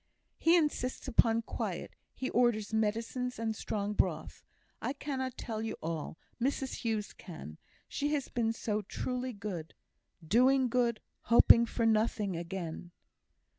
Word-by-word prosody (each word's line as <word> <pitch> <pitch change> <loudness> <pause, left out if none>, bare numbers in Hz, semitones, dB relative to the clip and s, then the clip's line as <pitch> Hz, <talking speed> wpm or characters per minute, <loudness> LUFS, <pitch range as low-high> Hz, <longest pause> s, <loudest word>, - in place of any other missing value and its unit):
"He 335 +2 +5
insists 295 -5 -1
upon 230 0 +3
quiet; - - -4 0.2
he 260 - -3
orders 225 -3 +2
medicines 230 +4 -1
and 225 -1 -1
strong 210 -1 -2
broth. 165 -6 -1 0.4
I 260 - -1
cannot 260 -3 -4
tell 220 -3 -4
you 225 - -3
all; 160 -1 -4 0.2
Mrs 270 +1 -1
Hughes 220 -3 -2
can. 120 - -10 0.3
She 290 +1 -1
has 280 -2 -2
been 230 -2 0
so 215 -2 -2
truly 250 +5 -3
good. 200 -7 -6 0.5
'Doing 255 +6 +4
good, 235 -2 +1 0.2
hoping 235 0 +7
for 230 0 -1
nothing 215 -3 +2
again.'" 170 0 -5
225 Hz, 130 wpm, -32 LUFS, 205-250 Hz, 0.5 s, hoping